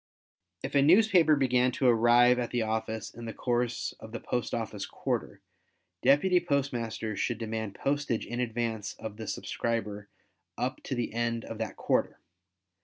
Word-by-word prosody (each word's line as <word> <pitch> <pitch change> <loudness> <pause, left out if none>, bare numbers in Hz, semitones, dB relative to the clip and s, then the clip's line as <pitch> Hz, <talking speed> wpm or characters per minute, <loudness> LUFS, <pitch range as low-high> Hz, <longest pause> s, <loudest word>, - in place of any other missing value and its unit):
If - - -4
a 140 - +5
newspaper 175 -1 +6
began 125 -2 +3
to 130 - -1
arrive 120 +1 +5
at 120 - -2
the 120 -2 0
office 110 0 -3
in 120 - -9
the 115 - -6
course 120 -1 -1
of 110 0 -11
the 115 - -3
post 125 -1 -2
office 110 -3 -3
quarter, - - -3 0.6
deputy 180 +6 +4
postmasters 125 - -2
should 120 - 0
demand 110 -2 -4
postage 140 -4 -1
in 120 - -4
advance 115 -3 -2
of 110 -1 -7
the 110 -1 -7
subscriber 105 -3 -3 0.5
up - - -2
to - - -2
the 120 -2 -2
end 115 0 -1
of 115 - -7
that 110 -3 -3
quarter. - - 0
120 Hz, 160 wpm, -29 LUFS, 110-130 Hz, 0.6 s, newspaper